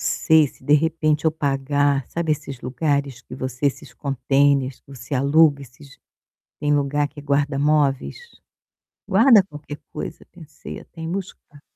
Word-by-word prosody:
não - - -6
sei, 160 -2 +3
se, 130 - -16
de 145 +3 +4
repente, 155 0 +1
eu 160 - +4
pagar, 140 -2 0
sabe, 165 -1 -3
esses 140 -3 -3
lugares 140 0 -2
que 125 - -11
você 130 +1 -3
esses 140 - -3
contêineres, 140 -1 +1
que - - -41
você 125 +2 -11
aluga 140 +2 +4
esses 135 +2 -15 0.6
tem 150 -1 +1
lugar 145 +1 0
que 145 -1 -12
guarda 140 0 0
móveis, 145 -2 +1 0.9
guarda 215 +2 +6
qualquer 150 -4 -10
coisa. - - -7
Pensei 155 -4 -10
até 165 - -13
em 165 - -4
buscar. 180 -6 -8
145 Hz, 155 wpm, -22 LUFS, 135-155 Hz, 0.9 s, guarda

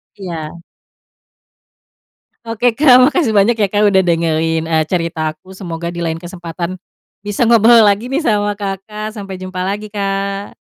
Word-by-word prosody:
Iya. 170 -4 -7 1.8
Oke 230 +1 0
Kak, 255 -1 +6
makasih 305 -4 +1
banyak 215 +2 +3
ya 210 -4 0
Kak 210 +1 +2
udah 190 -2 +4
dengerin, 165 -2 0
eee, 160 -1 +1
cerita 165 -3 -1
aku, 170 +5 -15
semoga 170 -2 -6
di 170 - -4
lain 165 -1 -2
kesempatan, 175 0 -6 0.5
bisa 205 +3 -1
ngobrol 230 0 +6
lagi 205 +5 +1
nih, 270 - 0
sama 205 -8 0
Kakak. 210 +2 -5
Sampai 195 -3 -7
jumpa 185 0 -5
lagi, 200 +3 -3
Kak! 195 0 -3
195 Hz, 145 wpm, -16 LUFS, 170-215 Hz, 1.8 s, Kak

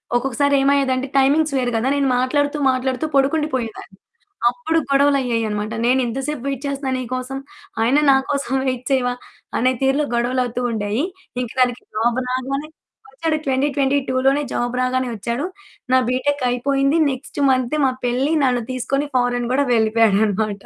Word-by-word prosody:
ఒక్కొక్కసారి 270 +3 +1
ఏమయ్యేదంటే 270 -1 +2
టైమింగ్స్ 285 +2 +3
వేరు 245 -1 0
గదా 240 +4 +1
నేను 280 -1 +1
మాట్లాడుతూ, 285 +3 0
మాట్లాడుతూ 255 +2 -1
పడుకుండి 300 +3 +2
పోయేదాన్ని. 225 -5 -6 0.5
అప్పుడు 325 +5 -1
గొడవలు 280 0 +4
అయ్యాయన్నమాట. 220 -3 -2
నేను 255 +2 +3
ఇంత 235 +4 -3
సేపు 300 -4 -4
వైట్ 275 0 -3
చేస్తున్నా 275 -1 -3
నీకోసం, 255 +2 -4 0.4
ఆయన 255 +6 +3
నాకోసం 270 0 0
వైట్ 255 -1 -2
చేయవా 245 -2 +2 0.4
అనే 255 +2 +3
తీరులో 270 +2 +2
గొడవలవుతూ 245 0 0
ఉండేయి. 215 +5 -1 0.4
ఇంక 240 - -4
దానికి 250 -1 +1
జాబ్ 235 +3 +1
రాగానే 270 +4 -2 0.5
వచ్చాడు 315 +2 -1
2022 270 0 0
లోనే 280 +2 +3
జాబ్ 240 +1 -1
రాగానే 255 0 0
వచ్చాడు. 235 - -3 0.5
నా 260 - +6
బీటెకైయిపోయింది 275 +2 +1
నెక్స్ట్ 265 +2 -7
మంతే 255 +4 0
మా 260 - +3
పెళ్లి 260 +6 +1
నన్ను 245 -2 +1
తీసుకొని 275 +3 -1
ఫారిన్ 245 -1 +1
కూడా 280 +1 +2
వెళ్ళిపోయాడన్నమాట. 215 -2 +2
260 Hz, 140 wpm, -20 LUFS, 245-280 Hz, 0.5 s, నా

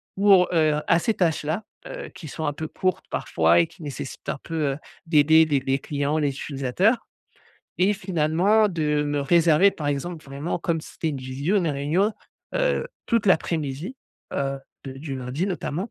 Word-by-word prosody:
pour 195 -2 +5
heu, 155 -2 +3
à 170 - +4
ces 225 - +1
tâches-là, 165 0 0 0.2
heu, - - -7
qui 180 -4 -9
sont 160 +2 -5
un 145 - +1
peu 155 +2 -5
courtes 185 +3 -2
parfois 85 +1 +2
et 85 - +3
qui 160 - -15
nécessitent 135 -3 -7
un - - -3
peu, 155 -4 -1
heu, - - -6 0.3
d'aider 160 0 +5
les 145 -3 +1
les 135 +1 0
clients, 145 +1 -1
les 145 -3 +1
utilisateurs 145 - 0 0.7
et 190 +3 +4
finalement 185 +4 +2
de 150 -5 0
me 145 -1 -1
réserver, 170 +4 +5
par 150 -5 -6
exemple, 155 +3 -3
vraiment 140 +5 -4
comme 165 -1 -1
ci - - -11
c'était 160 - -2
une 145 - -2
visio, 135 +9 -1
une 175 -4 +2
réunion, 155 +9 +1 0.4
heu, - - +1 0.2
toute 230 -3 +1
l'après-midi, 160 - 0 0.4
heu, 135 0 -1 0.3
de 135 - -6
du 135 +1 -6
lundi 130 +7 -3
notamment 185 +1 -3
155 Hz, 175 wpm, -24 LUFS, 140-180 Hz, 0.7 s, pour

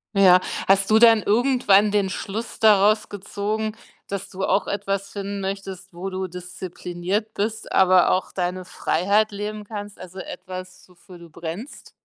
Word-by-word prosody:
Ja, 185 -2 +7 0.3
hast 195 +1 +4
du 220 +1 +6
dann 225 -2 +7
irgendwann 215 -3 +3
den 200 -2 +1
Schluss 215 +4 -5
daraus 215 0 +4
gezogen, 210 +2 -3 0.3
dass 195 -1 -5
du 190 0 -3
auch 200 - +1
etwas 195 -1 -2
finden 200 0 -5
möchtest, 195 -1 -6
wo 185 +3 -5
du 190 0 -3
diszipliniert 180 +3 -4
bist, 215 +2 -3
aber 185 -1 +5
auch 185 - 0
deine 180 0 -2
Freiheit 200 +6 +1
leben 210 +1 -5
kannst? 205 -1 -7
Also 185 +1 -10
etwas, 185 0 -8
wofür 180 0 -16
du 170 -1 -13
brennst? 170 - -8
195 Hz, 150 wpm, -23 LUFS, 185-210 Hz, 0.3 s, Ja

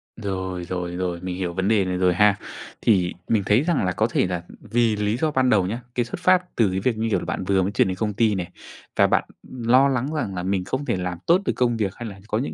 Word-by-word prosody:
Rồi, 95 -4 -4
rồi, 90 0 -4
rồi, 90 -1 -2
mình 90 -1 -4
hiểu 90 -2 -3
vấn 95 +2 -1
đề 105 -3 +3
này 90 0 -2
rồi 90 -1 +3
ha. 105 +2 +4 0.5
Thì 90 -6 +2
mình 110 -3 +2
thấy 105 +5 +4
rằng 165 - +1
là 90 - +1
có 110 +5 +1
thể - - +2
là, 90 -2 -3
ừm, - - -14
vì 115 -2 +3
lý 105 +2 0
do 155 +3 0
ban 130 -3 +2
đầu 100 -6 +3
nhá, 115 +6 -4
cái 120 - +1
xuất 120 - -6
phát 180 0 +2
từ 110 -4 +3
cái 95 - -1
việc, 115 +3 0
như 115 +1 -1
kiểu - - +1
là, - - -7
bạn - - -3
vừa 95 0 +2
mới 95 +2 -1
chuyển 100 - +2
đến 95 -1 -3
công 105 +1 -1
ty 110 0 +2
này, 90 -1 -4 0.4
và - - +5
bạn, - - +2 0.3
ừm, 125 -2 -8
lo 130 +3 +6
lắng 135 +2 -1
rằng 115 -11 -2
là 90 - -3
mình 95 0 0
không 130 +8 -3
thể - - 0
làm 90 -1 -3
tốt 175 +3 +5
được - - +1
công 120 -2 +1
việc, 100 -3 -1
hay 120 -2 -6
là 100 -1 -11
có 110 - 0
những 130 - -3
105 Hz, 290 wpm, -23 LUFS, 95-120 Hz, 0.5 s, lo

